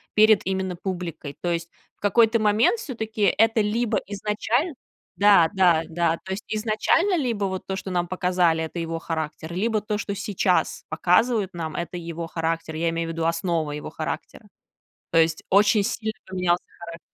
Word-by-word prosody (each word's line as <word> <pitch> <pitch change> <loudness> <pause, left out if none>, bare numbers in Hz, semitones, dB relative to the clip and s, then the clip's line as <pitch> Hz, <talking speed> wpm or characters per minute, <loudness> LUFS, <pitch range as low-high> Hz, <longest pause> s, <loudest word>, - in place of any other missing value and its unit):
перед 215 -1 +6
именно 190 -1 -1
публикой. 175 -5 -5
То 175 - -1
есть 170 0 -2 0.3
в - - -43
какой-то 225 +2 +3
момент 215 - +3
всё-таки 220 - -5 0.2
это 225 0 +4
либо 215 0 0
изначально 215 - -1 0.4
да 200 -5 +6
да 175 -4 +4
да, 165 0 +1
то 190 - -7
есть 195 - -4
изначально 225 - +1
либо 230 -8 -1
вот 190 -1 -4
то, 190 - -3
что 190 - -6
нам 175 -1 0
показали 180 -3 +1
это 160 +2 -6
его 165 0 -3
характер, 160 0 -4
либо 215 +3 0
то, 210 0 -2
что 205 -1 -3
сейчас 195 -2 0
показывают 195 +4 +2
нам 160 -2 -5
это 170 +1 -4
его 170 -1 -5
характер. 165 0 -3
Я 165 +1 0
имею 165 0 -2
в - - -2
виду 165 0 -2
основы 165 -2 -1
его 150 - -6
характера. - - -6 0.6
То 165 - +2
есть 160 0 +3
очень 205 +1 +4
сильно 220 +2 -2
поменялся 180 -2 0 0.2
характер. 170 0 -8
185 Hz, 170 wpm, -24 LUFS, 165-215 Hz, 0.6 s, перед